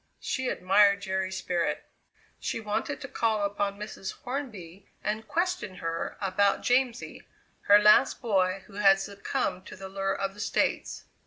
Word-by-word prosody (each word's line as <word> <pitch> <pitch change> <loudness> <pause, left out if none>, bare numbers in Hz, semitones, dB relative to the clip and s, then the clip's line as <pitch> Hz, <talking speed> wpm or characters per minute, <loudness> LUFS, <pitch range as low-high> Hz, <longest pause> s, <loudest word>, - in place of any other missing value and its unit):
She 260 -1 -2
admired 200 +2 +4
Jerry's 190 -1 -2
spirit! 175 -2 -1 0.5
She - - -3
wanted 220 +7 -2
to 275 - -5
call 220 -5 0
upon 200 0 -1
Mrs. 205 -2 -6
Hornby 215 - -6 0.2
and 215 +1 -2
question 340 - -1
her 165 -2 -4
about 200 +1 +1
Jamsie, 245 -1 0 0.5
her 205 - +9
last 210 +5 +5
boy, 190 -4 +1
who 205 - -17
had 195 -1 +5
succumbed 195 -2 -3
to - - -9
the 190 +1 -8
lure 195 0 -1
of 195 0 -2
the 205 - -15
States. - - -1
200 Hz, 150 wpm, -28 LUFS, 190-215 Hz, 0.5 s, her